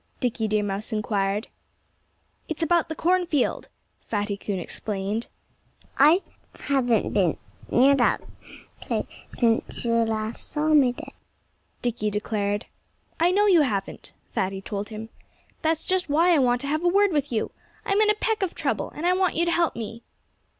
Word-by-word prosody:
Dickie 235 -3 -1
Deer 210 0 +1
Mouse 205 +3 -3
inquired. 210 0 -1 1.0
"It's 320 +1 -2
about 335 0 +2
the 320 - -4
cornfield," 345 -6 +1 0.3
Fatty 205 -1 -2
Coon 200 -1 -4
explained. 200 +4 -3 0.7
"I 310 +7 +6 0.4
haven't 245 -6 +1
been 185 -6 +2 0.3
near 265 +3 +5
that 260 -3 +3 0.6
place - - -2 0.3
since 230 0 0
you 235 - +1
last 225 -1 -1
saw 305 +1 0
me 285 -5 +5
there," 245 - -10 0.7
Dickie 235 -3 -1
declared. 205 0 -2 0.5
"I 340 +2 +4
know 405 +3 +3
you 365 -6 +6
haven't," 200 -9 -2 0.2
Fatty 190 0 -1
told 205 +1 -5
him. 220 0 -7 0.5
"That's 320 0 0
just 370 -3 0
why 335 +5 +4
I 315 - +4
want 245 -2 +2
to 280 - -4
have 310 +3 -1
a - - +3
word 400 +2 +4
with 290 -4 -1
you. 220 -2 -1 0.3
I'm 400 +1 +2
in 425 - +4
a 425 - +4
peck 435 0 -1
of 380 -3 -1
trouble. - - -2
And 315 - -4
I 360 - +4
want 370 -2 +1
you 340 - +2
to 340 - +1
help 340 -1 +1
me." 230 0 -6
245 Hz, 165 wpm, -25 LUFS, 215-335 Hz, 1.0 s, I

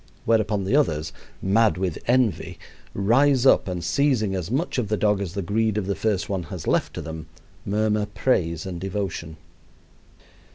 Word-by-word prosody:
Whereupon 110 -3 +2
the 95 +8 +1
others, 80 - +1 0.3
mad 105 +1 +3
with 90 -3 -2
envy, 125 -3 +1 0.4
rise 130 +6 +3
up, 130 - +5
and 90 -2 -3
seizing 125 -3 +1
as 90 -2 -3
much 135 +3 -1
of 115 - -1
the 110 +1 0
dog 105 -1 +2
as 90 -3 -5
the 100 - -2
greed 110 +3 0
of 105 - -1
the 100 - 0
first 105 -2 -1
one 95 -2 -2
has - - -7
left - - 0
to - - -4
them, 80 -1 -7 0.4
murmur 105 +1 +1
praise 85 - 0
and 90 -3 -6
devotion. 95 -5 -4
100 Hz, 170 wpm, -24 LUFS, 95-115 Hz, 0.4 s, up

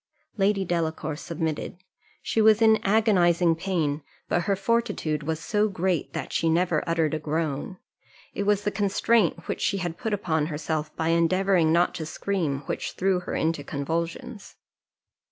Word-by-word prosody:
Lady 195 -1 +1
Delacour 160 -3 -2
submitted: 160 +1 -4 0.5
she 225 - +1
was 215 0 +6
in 220 -1 +5
agonizing 180 -5 +3
pain, 160 -4 -1 0.3
but 175 - 0
her 200 -1 +2
fortitude 195 -7 0
was 160 +1 -2
so 210 +4 +1
great 185 -4 -1
that - - -5
she 165 - +1
never 170 -1 +2
uttered 165 -2 +1
a 155 - -1
groan. 155 +2 -3 0.6
It - - -3
was 205 0 +2
the 205 - 0
constraint 205 -1 +1
which - - -3
she 200 - +1
had 175 -3 -4
put 225 -3 -2
upon 160 -7 0
herself, 155 -1 -3
by 160 0 -1
endeavouring 170 0 +3
not 170 +2 +3
to 160 -3 -5
scream, 160 -6 -2
which 140 - -4
threw 190 -1 +1
her 180 - -5
into 160 -2 0
convulsions. 170 - -4
170 Hz, 155 wpm, -26 LUFS, 160-195 Hz, 0.6 s, was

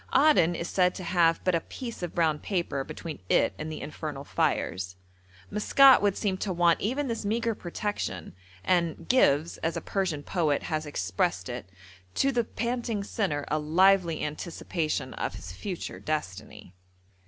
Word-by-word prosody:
Aden 265 - +5
is 170 - -3
said 180 -1 +2
to 185 - -6
have 170 -1 +3
but 185 - +2
a 165 - +2
piece 235 +1 -7
of 175 -2 -5
brown 160 -3 +2
paper 170 -8 -2
between 160 +3 -7
it - - +3
and 155 +1 -4
the 155 - -6
infernal 150 -2 -6
fires. 90 -8 -1 0.6
Maskat 265 +5 +6
would 200 -1 +2
seem 195 -3 0
to 195 +1 -2
want 175 -1 +3
even 265 +7 -1
this 230 -2 -3
meagre 230 +2 0
protection, 175 - -4 0.3
and 170 -3 0
'gives,' 165 - +3
as 165 0 -1
a - - 0
Persian 180 -7 -2
poet 155 -5 0
has 155 -2 -2
expressed 95 -9 -1
it, 90 - -6 0.5
'to 275 - +3
the 240 -3 +1
panting 235 -2 -2
sinner 185 -9 -2
a 155 - +1
lively 170 +2 +3
anticipation 155 -3 -3
of - - -3
his 90 +1 -8
future 175 - -6
destiny.' 105 -10 -5
170 Hz, 160 wpm, -28 LUFS, 150-205 Hz, 0.6 s, Maskat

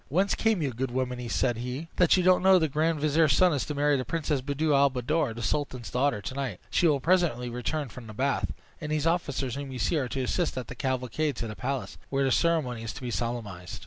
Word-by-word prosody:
"Whence 190 +7 +2
came 220 -7 +1
you, 140 - 0
good 125 +2 -3
woman," 125 -1 -3
said 120 0 +1
he, 125 +7 -4
"that 180 +1 +5
you 185 - +2
don't 185 0 +5
know 190 +1 +6
that 185 - +7
the 160 - +3
grand 155 +2 0
vizier's 155 -1 +3
son 180 +6 +4
is 140 - -1
to 150 - -3
marry 145 0 +3
the 130 - -1
princess 150 -2 -1
Buddir 145 +3 0
al 140 0 +5
Buddoor, 130 0 -1
the 120 - -5
sultan's 130 0 -2
daughter, 125 -5 +1
to - - -4
night? 130 -9 -3
She 175 - +3
will 145 -3 +3
presently 160 -7 +1
return 135 +5 -2
from 115 0 -11
the 110 - -9
bath; 135 +4 0 0.3
and 150 -1 -4
these 155 0 0
officers 140 -7 0
whom 140 0 -5
you 130 - -5
see 135 +8 +1
are 130 - -1
to 135 0 -2
assist 160 +4 -1
at 125 -3 -5
the - - -5
cavalcade 130 +3 -1
to 115 - -4
the 105 - -6
palace, 135 +2 -4
where 135 0 +1
the 135 - +2
ceremony 150 -8 +1
is 115 0 -5
to - - -9
be 125 - -3
solemnized." 110 -8 -4
135 Hz, 250 wpm, -28 LUFS, 125-155 Hz, 0.3 s, that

